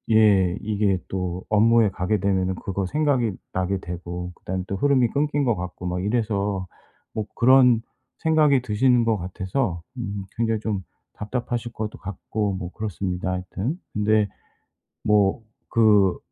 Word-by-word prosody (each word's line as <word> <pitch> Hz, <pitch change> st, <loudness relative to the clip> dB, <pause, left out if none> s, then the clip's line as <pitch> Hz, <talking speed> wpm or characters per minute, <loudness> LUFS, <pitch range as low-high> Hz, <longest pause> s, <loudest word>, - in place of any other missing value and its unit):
예. 100 Hz, -4 st, +5 dB
이게 100 Hz, -3 st, +1 dB
또 90 Hz, -1 st, -3 dB
업무에 110 Hz, 0 st, +5 dB
가게 95 Hz, +3 st, -1 dB
되면은 95 Hz, -1 st, +1 dB
그거 95 Hz, +2 st, -3 dB
생각이 130 Hz, -1 st, +1 dB, 0.2 s
나게 95 Hz, +1 st, 0 dB
되고 90 Hz, +1 st, -6 dB
그다음에 95 Hz, +1 st, -4 dB
또 100 Hz, -, -2 dB
흐름이 130 Hz, 0 st, +3 dB
끊긴 145 Hz, 0 st, 0 dB
것 120 Hz, -3 st, +2 dB
같고 90 Hz, 0 st, -6 dB
막 90 Hz, +1 st, -2 dB
이래서 100 Hz, -4 st, -1 dB, 0.5 s
뭐 110 Hz, -, -2 dB
그런 125 Hz, -2 st, +6 dB, 0.4 s
생각이 155 Hz, -5 st, +4 dB
드시는 120 Hz, +1 st, +3 dB
것 110 Hz, -2 st, +2 dB
같아서 95 Hz, +1 st, -2 dB, 0.2 s
음 100 Hz, -4 st, -4 dB
굉장히 115 Hz, -2 st, +1 dB
좀 105 Hz, -4 st, -2 dB, 0.3 s
답답하실 120 Hz, +2 st, -4 dB
것도 110 Hz, -1 st, -5 dB
같고 100 Hz, +1 st, -3 dB
뭐 90 Hz, -1 st, -5 dB
그렇습니다 95 Hz, -3 st, -3 dB
하여튼. 95 Hz, -, -3 dB, 0.2 s
근데 105 Hz, -1 st, +2 dB, 0.7 s
뭐 105 Hz, +1 st, +3 dB, 0.3 s
그 105 Hz, -5 st, +4 dB
105 Hz, 285 characters per minute, -24 LUFS, 95-115 Hz, 0.7 s, 그런